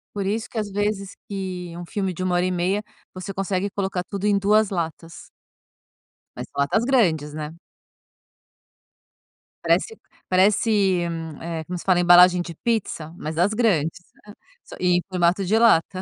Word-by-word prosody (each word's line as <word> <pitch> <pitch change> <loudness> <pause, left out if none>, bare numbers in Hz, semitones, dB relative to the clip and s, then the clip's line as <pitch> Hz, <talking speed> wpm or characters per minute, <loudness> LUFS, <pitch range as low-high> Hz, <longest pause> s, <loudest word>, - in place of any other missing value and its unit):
Por 200 - -2
isso 220 +3 -2
que - - -9
às 210 -2 -2
vezes 200 -1 -2
que 185 -3 -5
um 175 - -7
filme 190 +1 -3
de 180 - -7
1 185 -1 0
hora 175 +1 +2
e 185 - 0
meia, 185 +4 0 0.3
você 185 +1 -7
consegue 195 +1 -2
colocar 190 -2 -3
tudo 200 +1 -5
em 200 -1 +3
2 210 +1 +3
latas. 165 -2 -5 1.1
Mas - - -7
são 140 - -3
latas 215 +11 +1
grandes, 165 - +2
né. 155 0 -6 2.1
Parece 450 - +1 0.3
parece, 195 0 +3 0.4
eh, 165 -1 -4
como 180 0 -4
se - - -8
fala? 185 -2 +3
Embalagem 180 0 +7
de 170 -2 -7
pizza, 190 -9 -2
mas 155 +1 -5
das 180 +6 +2
grandes, 180 -9 +1 0.3
hã, 205 - -11 0.5
e 180 -1 +3
em - - 0
formato 185 +1 +1
de 210 +5 +2
lata. 185 -5 +3
185 Hz, 160 wpm, -23 LUFS, 175-205 Hz, 2.1 s, Embalagem